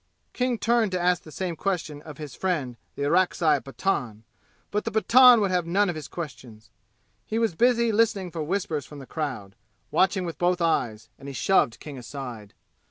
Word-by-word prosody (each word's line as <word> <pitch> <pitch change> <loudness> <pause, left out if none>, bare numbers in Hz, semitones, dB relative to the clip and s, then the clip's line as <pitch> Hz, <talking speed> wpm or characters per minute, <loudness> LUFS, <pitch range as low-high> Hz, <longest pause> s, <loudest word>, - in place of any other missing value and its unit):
King 250 -1 0
turned 230 -2 +2
to 180 - 0
ask 180 0 +2
the 155 - -13
same 180 +1 -3
question 165 -5 -3
of 150 -2 -11
his 150 -4 -8
friend 155 -10 -2 0.2
the 140 - -3
Orakzai 165 -2 +3
Pathan; 125 - -3 0.5
but 210 0 -1
the - - -2
Pathan 240 +3 +7
would 200 -2 +1
have 180 -2 0
none 195 +3 +2
of - - -8
his 155 -2 -7
questions, 120 -9 -9 0.5
he 220 - -3
was 225 -5 +1
busy 235 +4 +3
listening 205 -4 +1
for 165 - -4
whispers 160 -3 -2
from 150 - -11
the 135 - -9
crowd, 130 -11 -5 0.4
watching 190 0 +2
with 170 - -6
both 180 0 +2
eyes, 115 -10 0
and 135 - -10
he 140 - -6
shoved 125 -8 +2
King 145 -4 -8
aside. 120 -5 -8
170 Hz, 185 wpm, -26 LUFS, 140-195 Hz, 0.5 s, Pathan